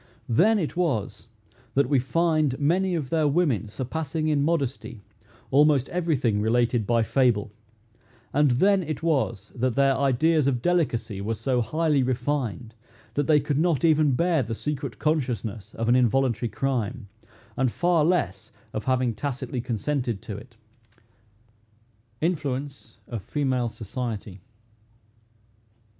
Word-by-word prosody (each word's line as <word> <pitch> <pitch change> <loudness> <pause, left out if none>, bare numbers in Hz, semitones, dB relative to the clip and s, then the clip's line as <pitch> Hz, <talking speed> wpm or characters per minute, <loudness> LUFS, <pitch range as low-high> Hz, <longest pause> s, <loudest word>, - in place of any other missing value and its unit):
Then 195 - +4
it 170 -5 -2
was 115 - -2 0.5
that 140 +1 +3
we 140 -3 +3
find 155 0 +1
many 180 +5 +1
of 150 -6 -4
their 160 -2 +2
women 140 - +1
surpassing 155 +6 -3
in 150 -2 +2
modesty 135 -8 -2 0.5
almost 145 -1 +4
every 170 -3 0
thing 110 -5 0
related 115 0 +1
by 115 -1 +3
fable; 115 -4 +1 0.8
and 145 0 +4
then 190 +11 +3
it 155 -3 -5
was 135 - 0
that 125 -1 -1
their 135 -1 +3
ideas 140 +3 +2
of 130 -3 +1
delicacy 120 - 0
were 110 +3 -2
so 125 +2 0
highly 150 +4 +1
refined, 125 -3 -2 0.4
that 145 -1 -1
they 150 -2 +5
could 145 0 -1
not 170 -2 +2
even 155 -4 +4
bear 170 0 +2
the 115 -2 -4
secret 140 -1 -4
consciousness 120 -9 -2
of 115 - -2
an 120 - +4
involuntary 125 -1 +2
crime, 125 -4 -2 0.5
and 130 -2 +1
far 175 +1 +2
less 110 - 0 0.2
of 110 - -4
having 130 -2 +1
tacitly 130 +1 -4
consented 120 -1 -2
to 105 - -6
it. 115 +2 -12 1.6
INFLUENCE 145 -4 -3
OF 115 -4 -5
FEMALE 130 -1 -1
SOCIETY. 110 -3 -6
135 Hz, 135 wpm, -25 LUFS, 115-155 Hz, 1.6 s, they